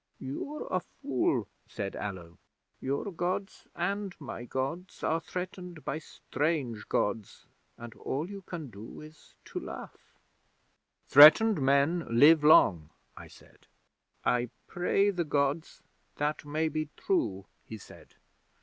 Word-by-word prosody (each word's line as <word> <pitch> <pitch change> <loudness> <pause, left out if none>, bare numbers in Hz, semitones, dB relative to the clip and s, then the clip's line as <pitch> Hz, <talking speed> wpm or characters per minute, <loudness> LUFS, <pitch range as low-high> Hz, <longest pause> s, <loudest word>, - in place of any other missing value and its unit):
'"You're 285 - -5
a 185 - +2
fool," 135 -6 -1 0.2
said 100 -1 -5
Allo. 90 -5 -7 0.4
"Your 140 +9 -2
Gods 180 +3 -3
and 195 +2 -2
my 135 -4 -7
Gods 135 +9 -4
are 160 +1 +1
threatened 180 -1 -7
by 155 - -2
strange 145 -7 -3
Gods, 105 0 -2 0.3
and 120 -1 -9
all 145 +7 -4
you 200 0 -8
can 165 -8 -7
do 105 +2 -10
is 155 0 -15
to - - -5
laugh." 65 -1 -10 0.9
'"Threatened 155 +7 +8
men 140 +5 +2
live 145 +7 +6
long," 85 - +5 0.3
I - - -11
said. - - -20 0.6
'"I 125 -1 +1 0.2
pray 195 +3 +1
the 180 -3 -1
Gods 145 +1 -1 0.3
that 150 0 -2
may 155 +2 -1
be 155 -1 -3
true," 100 - -1 0.2
he 110 - -7
said. 100 - -15
150 Hz, 125 wpm, -30 LUFS, 120-175 Hz, 0.9 s, Threatened